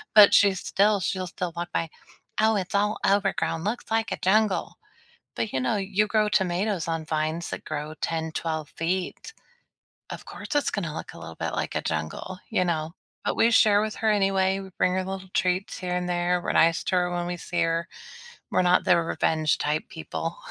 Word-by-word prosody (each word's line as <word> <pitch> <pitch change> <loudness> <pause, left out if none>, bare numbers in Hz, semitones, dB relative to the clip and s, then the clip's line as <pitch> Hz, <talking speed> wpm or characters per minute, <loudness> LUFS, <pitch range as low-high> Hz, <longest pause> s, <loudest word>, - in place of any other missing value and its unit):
But 210 -1 +9
she's 195 -2 +5
still 205 +1 +2
she'll 185 0 -2
still 175 -1 -4
walk 175 +1 -4
by, 165 - -1 0.5
"Oh, 220 0 +4
it's 195 +2 -3
all 210 +1 +1
overgrown. 195 -4 +1
Looks 220 +4 -2
like 225 -1 +1
a - - -1
jungle." 210 +1 +2 0.6
But, 225 - -2
you 130 - 0
know, 130 +11 +1
you 200 +2 +1
grow 215 0 +2
tomatoes 185 -1 0
on 165 -1 -2
vines 155 +2 -2
that - - -6
grow 150 0 -4
10, 160 -1 -2
12 160 -3 -3
feet. 185 - -3 0.8
Of - - -7
course, - - -9
it's 290 - +2
gonna 165 -7 -3
look - - -7
a - - -10
little - - -9
bit - - -3
like - - -3
a - - +1
jungle, 80 - -4
you 200 -4 +2
know? 160 -2 -1 0.3
But - - 0
we 230 - +4
share 210 -2 +5
with 215 0 -2
her 220 -1 +1
anyway. 195 -1 +2
We 190 - -8
bring 180 - +3
her 185 0 0
little 190 0 -6
treats 185 +1 0
here 180 -1 -3
and 180 0 -1
there. 175 0 +1
We're - - -1
nice 165 +1 +3
to 185 - 0
her 180 0 +2
when 175 0 -2
we 175 0 -3
see 175 0 -2
her. 165 0 0 0.6
We're - - +3
not 180 0 +4
the 175 - +5
revenge 155 -1 +1
type 150 +1 -1
people. 165 +1 -5
180 Hz, 200 wpm, -26 LUFS, 165-200 Hz, 0.8 s, But